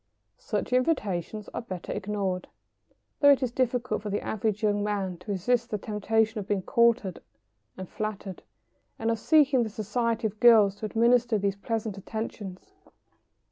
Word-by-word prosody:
] - - -49
Such - - -3
invitations 215 - 0
are - - -3
better 185 -6 -7
ignored, 195 -3 -2 0.7
though 285 - +6
it 280 -1 +5
is 250 - -1
difficult 245 -3 -1
for 210 - -5
the 205 - -2
average 215 0 -2
young 205 -1 +2
man 195 -4 -2
to 180 +4 -7
resist 235 +5 0
the 210 - -1
temptation 220 +2 0
of 200 - -6
being 200 -3 -1
courted 235 -5 +2 0.6
and 185 -1 -6
flattered, 210 -3 -5 0.6
and 225 +1 0
of 225 - -1
seeking 285 -2 +4
the 225 - -1
society 225 +2 -2
of 215 0 -3
girls 215 -5 +6
who 215 - -3
administer 235 +1 +3
these 200 -1 0
pleasant 215 -1 -3
attentions. 210 - -7
215 Hz, 160 wpm, -27 LUFS, 200-235 Hz, 0.7 s, though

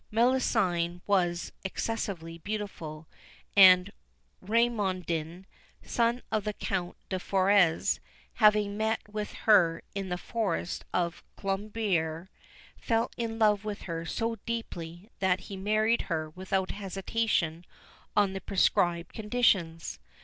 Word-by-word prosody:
Melusine 210 -8 +1
was 175 -4 +1
excessively 190 -5 -3
beautiful, 165 -6 -5 0.5
and 185 -1 +8 0.5
Raimondin, 185 -6 0 0.4
son 235 +1 0
of 215 - +1
the 210 0 -2
Count 185 -3 -3
de 185 - -1
Forez, 190 -3 +3 0.4
having 210 -1 +4
met 220 +1 0
with 210 0 -5
her 170 -7 +5
in 195 -1 -4
the 180 - -1
forest 190 -4 -2
of 170 -1 -1 0.2
Colombiers, 195 -4 -1 0.5
fell 230 0 0
in 225 -1 -3
love 210 -2 +3
with 210 -1 -5
her 165 -2 -4
so 225 +6 -2
deeply 190 -4 -5
that 190 -1 +2
he 200 - -8
married 215 +4 +2
her 155 -2 -2
without 190 +2 -2
hesitation 195 -4 -1 0.5
on 200 -2 +4
the 195 - -5
prescribed 175 -3 +1
conditions. 205 - +1
195 Hz, 115 wpm, -29 LUFS, 175-215 Hz, 0.5 s, and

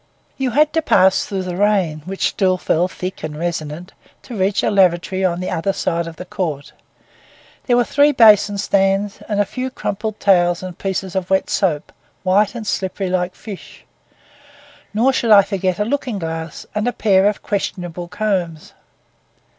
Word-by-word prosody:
You 265 -2 -1
had 295 +5 +2
to 320 - +2
pass 190 -9 +3
through 195 -2 -3
the 180 -1 -4
rain, 190 -6 +1
which 190 +1 -1
still 185 -2 +1
fell 175 0 +1
thick 185 0 -6
and 155 -1 -5
resonant, 165 +1 -4 0.3
to 245 - -8
reach 195 0 0
a - - +1
lavatory 185 -1 +2
on 175 -2 +1
the 185 - -3
other 195 +4 -1
side 170 -2 -1
of 165 - -8
the 180 - -8
court. 155 -8 -4 0.9
There 245 -2 +3
were 245 - +4
three 285 +5 +3
basin 210 -5 +5
stands, 195 0 +1
and 205 -1 0
a 205 - +3
few 255 +5 -4
crumpled 215 -3 -4
towels 175 -2 +3
and 185 -2 -6
pieces 190 -1 -4
of 190 -1 -2
wet 190 0 +1
soap, 160 -7 0 0.3
white 200 +4 +2
and 230 -2 -6
slippery 190 -1 -2
like 180 0 -1
fish; 205 -4 -11 1.1
nor 240 +6 +2
should 235 -3 0
I 205 -2 +8
forget 190 -2 -1
a 210 - 0
looking 250 -2 -2
glass 165 -2 -5
and 210 +3 -1
a 245 - 0
pair 195 -3 +3
of 210 - -2
questionable 175 -4 -3
combs. 180 -5 -3
190 Hz, 175 wpm, -19 LUFS, 175-210 Hz, 1.1 s, I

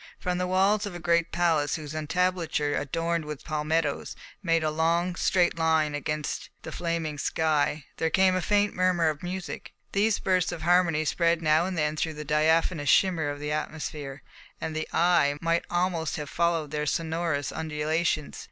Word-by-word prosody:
From 180 0 -2
the 180 - 0
walls 195 +3 +2
of 190 - -7
a - - -6
great 170 0 +1
palace 165 -4 +1
whose 155 -3 -7
entablature, 160 -1 0
adorned 165 +3 -1
with 150 -2 -7
palmettoes, 155 0 -1 0.3
made 165 -4 +1
a 155 - +1
long, 170 +3 +1
straight 175 -1 +1
line 160 -2 +2
against 150 +1 -3
the - - -7
flaming 165 -3 -3
sky, 155 -1 0
there 160 - +1
came 190 +2 +3
a 185 - 0
faint 205 +3 +2
murmur 180 -3 +2
of 150 -1 -4
music. 180 0 -6 0.2
These 210 +2 +2
bursts 185 -1 +1
of 160 - -6
harmony 170 -2 +3
spread 170 +1 +1
now 155 +3 +3
and 185 -2 -4
then 150 -1 0
through 160 0 -2
the 150 0 -7
diaphanous 155 0 +2
shimmer 175 -6 +3
of 145 0 -5
the 150 0 -4
atmosphere, 150 -3 -4 0.4
and 160 - -4
the 155 - -2
eye 165 -4 +3
might 165 +1 0
almost 175 -2 0
have 150 -4 -6
followed 165 -3 0
their 150 0 -2
sonorous 160 -3 -1
undulations. 155 0 -1
160 Hz, 170 wpm, -27 LUFS, 150-175 Hz, 0.4 s, came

